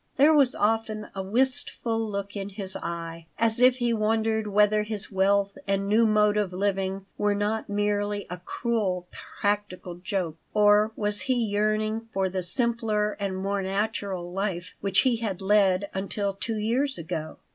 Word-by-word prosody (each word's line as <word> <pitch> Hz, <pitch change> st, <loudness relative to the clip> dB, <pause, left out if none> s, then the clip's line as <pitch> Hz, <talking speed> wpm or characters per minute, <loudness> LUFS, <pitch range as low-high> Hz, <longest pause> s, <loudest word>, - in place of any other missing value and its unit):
There 295 Hz, +3 st, +6 dB
was 280 Hz, -4 st, +4 dB
often 215 Hz, 0 st, 0 dB
a 195 Hz, -, -4 dB
wistful 235 Hz, +1 st, 0 dB
look 200 Hz, -2 st, -4 dB
in 200 Hz, 0 st, -4 dB
his 195 Hz, -1 st, -6 dB
eye, 165 Hz, -1 st, -6 dB
as 225 Hz, 0 st, +2 dB
if 250 Hz, 0 st, +6 dB
he 240 Hz, -2 st, +1 dB
wondered 220 Hz, 0 st, 0 dB
whether 210 Hz, +1 st, +3 dB
his 210 Hz, -1 st, -4 dB
wealth 200 Hz, +1 st, +1 dB
and 195 Hz, 0 st, 0 dB
new 220 Hz, +2 st, +4 dB
mode 210 Hz, -1 st, +3 dB
of 205 Hz, -3 st, 0 dB
living 195 Hz, 0 st, -1 dB
were 205 Hz, 0 st, +2 dB
not 210 Hz, +2 st, -1 dB
merely 205 Hz, 0 st, -1 dB
a 180 Hz, -, -6 dB
cruel 185 Hz, -2 st, -2 dB, 0.3 s
practical 205 Hz, -3 st, -1 dB
joke. 180 Hz, -3 st, -3 dB, 0.2 s
Or 210 Hz, +1 st, +5 dB
was 205 Hz, -1 st, +1 dB
he 255 Hz, -, +4 dB
yearning 215 Hz, 0 st, 0 dB
for 190 Hz, -1 st, 0 dB
the 185 Hz, 0 st, -2 dB
simpler 220 Hz, +1 st, +1 dB
and 195 Hz, -2 st, -2 dB
more 195 Hz, +1 st, -1 dB
natural 195 Hz, -2 st, -2 dB
life 190 Hz, -2 st, -3 dB
which 195 Hz, -1 st, +3 dB
he 255 Hz, -3 st, +2 dB
had 210 Hz, -5 st, -3 dB
led 195 Hz, -1 st, +3 dB
until 200 Hz, +1 st, -2 dB
two 220 Hz, +3 st, -3 dB
years 250 Hz, +6 st, 0 dB
ago? 160 Hz, -2 st, -5 dB
205 Hz, 160 wpm, -26 LUFS, 195-220 Hz, 0.3 s, There